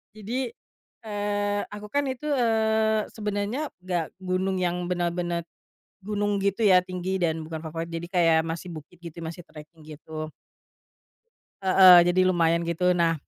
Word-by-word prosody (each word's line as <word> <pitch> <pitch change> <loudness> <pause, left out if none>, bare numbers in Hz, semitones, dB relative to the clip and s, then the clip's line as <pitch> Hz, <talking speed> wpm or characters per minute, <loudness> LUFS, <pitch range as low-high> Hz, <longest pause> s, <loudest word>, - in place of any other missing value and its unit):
Jadi, 235 +5 -3 0.6
eee, 205 -1 -1
aku 210 0 -9
kan 285 +3 0
itu, 270 +3 -4
eee, 220 -3 +2
sebenernya 210 +6 -3 0.2
gak 175 -3 -3
gunung 185 0 -1
yang 180 0 -1
benar-benar 175 -1 -1 0.6
gunung 205 0 -1
gitu 200 +3 +1
ya 185 -2 +6
tinggi 185 +1 -4
dan 160 -1 0
bukan 160 0 -5
favorit 165 +1 -5
jadi 165 +1 -5
kayak 165 -3 +4
masih 165 +2 -5
bukit 155 +3 -12
gitu 170 -1 -10
masih 165 +2 -7
treking 155 +1 -14
gitu. 155 0 -7 1.4
Heeh, 185 -2 +8
jadi 185 +1 +2
lumayan 170 -2 +2
gitu 170 +2 +1
nah, 165 -1 +2
180 Hz, 140 wpm, -26 LUFS, 170-205 Hz, 1.4 s, Heeh